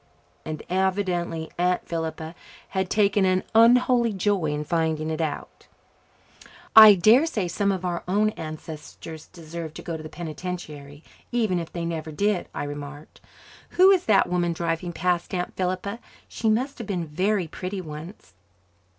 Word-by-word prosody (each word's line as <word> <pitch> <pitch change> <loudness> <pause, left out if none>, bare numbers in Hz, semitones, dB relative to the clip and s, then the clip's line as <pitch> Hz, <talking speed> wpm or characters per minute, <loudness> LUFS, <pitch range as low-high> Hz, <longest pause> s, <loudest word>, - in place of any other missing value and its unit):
And 155 -1 -5
evidently 180 -3 -1
Aunt 180 0 +1
Philippa 160 -1 -4 0.4
had 190 -1 -2
taken 205 -1 +3
an 185 0 +2
unholy 235 0 +5
joy 195 -2 0
in 150 0 -1
finding 160 0 -1
it 160 +1 -2
out. 155 -2 -5 1.1
"I 215 -2 +11
dare 225 - +5
say 210 - -2
some 200 +3 0
of 185 -1 -3
our 175 -1 -2
own 210 +3 +2
ancestors 155 -1 -9
deserved 165 -2 -8
to - - -8
go 165 - -4
to - - -9
the 155 - -8
penitentiary, 155 -3 -7 0.3
even 220 -7 +1
if 165 - -6
they 170 -1 -4
never 160 -2 -4
did," 200 +4 0
I - - -4
remarked. 145 +1 -8 0.6
"Who 375 +2 +8
is 370 -2 +2
that 205 -3 +4
woman 175 -1 0
driving 170 +1 -2
past, 175 +2 -1
Aunt 180 0 -3
Philippa? 185 +4 -2 0.3
She 225 - -1
must 255 +6 0
have 230 - -6
been 180 -4 -2
very 185 +5 0
pretty 185 +5 -5
once." 155 - -9
180 Hz, 155 wpm, -25 LUFS, 160-200 Hz, 1.1 s, I